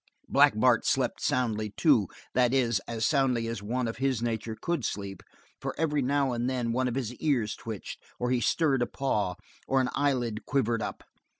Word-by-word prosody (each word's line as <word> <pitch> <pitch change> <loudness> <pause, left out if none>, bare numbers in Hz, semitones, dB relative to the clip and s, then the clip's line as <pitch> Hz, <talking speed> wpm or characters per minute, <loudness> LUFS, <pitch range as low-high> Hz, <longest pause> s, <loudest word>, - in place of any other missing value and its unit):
Black - - +5
Bart - - +4
slept - - 0
soundly, 110 -4 0
too, 130 - +4 0.3
that 125 0 +3
is, 120 -6 +2
as 115 -1 -1
soundly 130 -5 +2
as 115 -2 -4
one 120 +4 -1
of 115 - -4
his 130 -3 +1
nature 115 -1 -3
could 170 -6 -1
sleep, 100 -3 -4 0.4
for - - -4
every 150 -3 +1
now 135 0 +1
and 120 +1 -1
then 125 -3 -1
one 130 +1 +1
of 125 - -2
his 125 -3 -2
ears 125 -9 0
twitched, 110 -4 -7 0.2
or 125 0 -1
he 125 -1 +2
stirred 140 -4 +2
a 120 - +1
paw, 105 -9 -1 0.3
or 135 - +3
an 130 -1 +1
eyelid 120 -6 0
quivered 120 -4 +1
up. - - -5
125 Hz, 190 wpm, -28 LUFS, 115-135 Hz, 0.4 s, Black